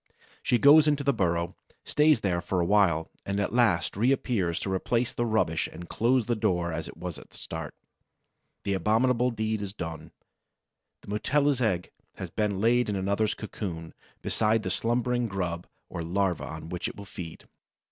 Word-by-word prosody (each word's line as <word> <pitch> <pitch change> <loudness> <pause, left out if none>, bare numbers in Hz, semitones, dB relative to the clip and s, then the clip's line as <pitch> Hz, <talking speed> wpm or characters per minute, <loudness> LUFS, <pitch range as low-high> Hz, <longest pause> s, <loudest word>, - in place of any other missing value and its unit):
She 120 - +2
goes 150 +5 +7
into 145 -1 +2
the 140 0 +2
burrow, 85 -4 0 0.3
stays 150 -5 +4
there 90 -3 0
for 90 +1 -1
a 85 - +2
while, 85 -5 +3
and 100 0 -2
at 100 - -1
last 110 -9 +2
reappears 110 -6 +1
to 95 - -2
replace 115 +5 0
the 120 - -1
rubbish 110 -8 +1
and 85 - -9
close 120 +4 +2
the 120 +1 0
door 90 -5 0
as 80 0 -4
it - - -11
was 90 -2 -6
at - - -15
the - - -14
start. 80 -2 -6 0.9
The 100 - 0
abominable 115 +6 +2
deed 110 -2 -2
is 100 0 -5
done: 80 -4 -6 0.9
the - - -13
Mutilla's 140 +6 +1
egg 95 -6 0 0.2
has - - -7
been 105 -3 -1
laid 120 +2 +3
in 105 - -1
another's 100 +3 0
cocoon, 85 -7 -6 0.3
beside 110 0 +2
the - - -2
slumbering 120 +1 0
grub 90 -4 -3 0.2
or - - -5
larva 90 0 0
on 80 - -7
which 90 0 -3
it - - -7
will 100 - -9
feed. 85 -4 -9
100 Hz, 180 wpm, -28 LUFS, 85-120 Hz, 0.9 s, goes